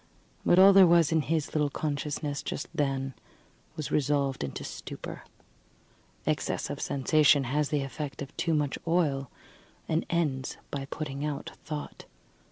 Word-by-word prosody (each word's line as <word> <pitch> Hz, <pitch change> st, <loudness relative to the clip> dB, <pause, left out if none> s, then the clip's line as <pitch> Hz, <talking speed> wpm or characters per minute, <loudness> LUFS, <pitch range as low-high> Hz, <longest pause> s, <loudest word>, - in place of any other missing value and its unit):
But 175 Hz, -, +4 dB
all 195 Hz, +1 st, +9 dB
that 195 Hz, -, +7 dB
there 185 Hz, -, +9 dB
was 170 Hz, -2 st, +5 dB
in 160 Hz, -1 st, +3 dB
his 155 Hz, 0 st, -1 dB
little 150 Hz, -2 st, +2 dB
consciousness 145 Hz, 0 st, -2 dB
just -, -, -4 dB
then 135 Hz, -4 st, -1 dB, 0.6 s
was 155 Hz, -, -4 dB
resolved 140 Hz, -, +1 dB
into 70 Hz, -, -5 dB
stupor. -, -, -7 dB, 1.0 s
Excess -, -, -1 dB
of -, -, -5 dB
sensation 145 Hz, +1 st, +4 dB
has 145 Hz, +3 st, 0 dB
the 145 Hz, -2 st, 0 dB
effect 135 Hz, +1 st, -5 dB
of 140 Hz, -, -11 dB
too 165 Hz, -2 st, +1 dB
much 145 Hz, -2 st, 0 dB
oil, 145 Hz, -6 st, +1 dB, 0.6 s
and 160 Hz, +1 st, 0 dB
ends 145 Hz, -6 st, -1 dB
by 140 Hz, -1 st, -3 dB
putting 140 Hz, -1 st, -5 dB
out 150 Hz, -2 st, -3 dB
thought. 150 Hz, -1 st, -6 dB
150 Hz, 150 wpm, -29 LUFS, 135-155 Hz, 1.0 s, all